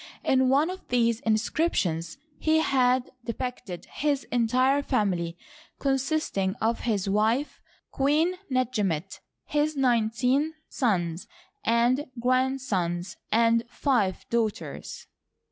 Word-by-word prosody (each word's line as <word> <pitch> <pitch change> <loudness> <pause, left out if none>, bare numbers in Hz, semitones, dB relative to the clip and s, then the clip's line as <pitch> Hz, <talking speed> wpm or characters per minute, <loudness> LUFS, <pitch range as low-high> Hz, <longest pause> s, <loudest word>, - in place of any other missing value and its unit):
In 260 -1 +3
one 290 +6 +3
of 375 - -10
these 235 -2 +2
inscriptions 215 - 0 0.2
he 315 0 +3
had 255 -4 +2
depicted 235 -6 -5
his 285 -2 -1
entire 255 +4 +3
family, 185 -11 -1 0.4
con 270 -1 +1
sisting 255 -9 -1
of 230 +1 0
his 205 -5 -1
wife. 220 +8 +1 0.3
Queen 300 +6 +2 0.2
Netjemety 210 -9 -1 0.3
his 300 0 0
nineteen 250 +4 +2
sons 175 - -1 0.4
and 245 +3 +2
grandsons, 235 -8 0
and 230 +1 +4
five 240 - 0
daughters. 230 -3 -3
245 Hz, 100 wpm, -27 LUFS, 210-270 Hz, 0.4 s, and